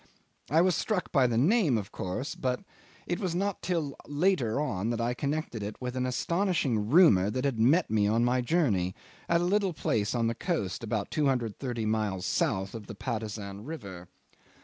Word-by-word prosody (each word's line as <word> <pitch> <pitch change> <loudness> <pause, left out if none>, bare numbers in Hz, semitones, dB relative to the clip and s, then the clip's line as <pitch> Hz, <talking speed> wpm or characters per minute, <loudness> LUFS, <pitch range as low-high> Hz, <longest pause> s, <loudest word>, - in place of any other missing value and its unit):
I 160 +3 +4
was 180 -1 +3
struck 185 +3 -1
by 135 -3 +4
the 115 -2 0
name, 160 - +3
of 100 -3 -5
course; 95 +9 -4
but 125 -1 -2 0.4
it 175 - -2
was 180 -4 -2
not 195 +1 -1
till 160 -6 -2
later 145 - +1
on 115 -8 -1
that 120 -1 -1
I 120 +1 0
connected 140 -3 -3
it 105 +1 -5
with 125 0 -4
an 130 0 0
astonishing 135 - 0
rumour 125 - +6
that 130 +5 -2
had 130 -5 0
met 145 +9 +3
me 105 -2 +3
on 115 +3 +2
my 125 +1 +2
journey, 115 - +1 0.3
at 170 0 +3
a - - +1
little 195 0 +1
place 115 -6 -1
on 115 -1 +1
the 115 - +1
coast 120 - -2
about 110 -2 -2
230 125 -4 -1
miles 105 -4 -1
south 100 - 0
of 110 -3 -8
Patusan 105 -3 -4
River. 100 - -8
125 Hz, 180 wpm, -29 LUFS, 110-160 Hz, 0.4 s, rumour